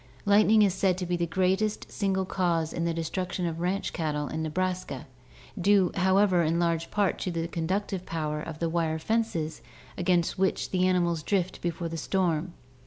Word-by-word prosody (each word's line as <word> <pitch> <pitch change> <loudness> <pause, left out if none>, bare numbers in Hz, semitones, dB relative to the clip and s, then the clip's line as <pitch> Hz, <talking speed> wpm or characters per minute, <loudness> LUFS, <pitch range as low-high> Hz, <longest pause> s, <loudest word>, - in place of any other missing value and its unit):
Lightning 210 +1 +5
is 195 -3 +3
said 190 -1 +1
to 185 - -3
be 175 0 0
the 170 0 -1
greatest 190 +5 0
single 190 -2 0
cause 170 -4 0
in 170 - -1
the 170 - +1
destruction 180 +3 -2
of 165 -1 -3
ranch 185 +4 -1
cattle 150 -3 -2
in 160 - -3
Nebraska, 180 -3 -2 0.5
due, 195 0 +4
however, 190 -1 +3
in 165 +1 +1
large 170 -1 0
part 205 -3 +1
to - - -2
the 165 -1 -2
conductive 185 +3 -2
power 155 -3 -3
of 155 0 -6
the 165 - -1
wire 165 -1 0
fences 165 - -1 0.4
against 175 -1 +1
which 190 0 0
the 185 -1 +2
animals 175 -3 +1
drift 185 +2 -1
before 170 0 -2
the 165 0 -5
storm. 175 -1 0
175 Hz, 175 wpm, -28 LUFS, 165-190 Hz, 0.5 s, Lightning